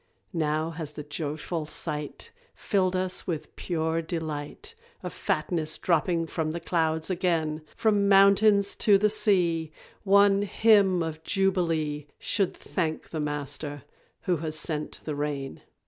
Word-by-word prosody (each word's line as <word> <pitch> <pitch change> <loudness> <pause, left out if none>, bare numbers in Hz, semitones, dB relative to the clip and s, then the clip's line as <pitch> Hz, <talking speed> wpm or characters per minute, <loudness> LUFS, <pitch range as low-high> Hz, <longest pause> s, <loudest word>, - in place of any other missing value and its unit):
Now 155 0 0
has 160 -2 -5
the 150 - -7
joyful 150 +2 -4
sight 150 - -4 0.2
Filled 185 -3 0
us 185 0 -2
with 165 -4 -4
pure 165 -1 -1
delight 160 - -5 0.3
Of - - -5
fatness 160 -4 -1
dropping 170 -1 +1
from 160 -1 -2
the 165 +2 -3
clouds 160 0 0
again; 165 -4 0
From 205 -2 +2
mountains 200 +1 +5
to 205 -4 +5
the 210 +1 +2
sea, 170 -7 +2 0.3
One 200 0 +5
Hymn 200 -4 +4
of 160 -1 -5
Jubilee 165 -6 0
Should 195 -2 -1
thank 160 -4 -3
the 160 - -3
Master 145 0 -3 0.4
who 180 -2 0
has 155 0 -2
sent 155 -2 -2
the 155 - -2
rain. 145 -2 -4
165 Hz, 130 wpm, -27 LUFS, 155-195 Hz, 0.4 s, mountains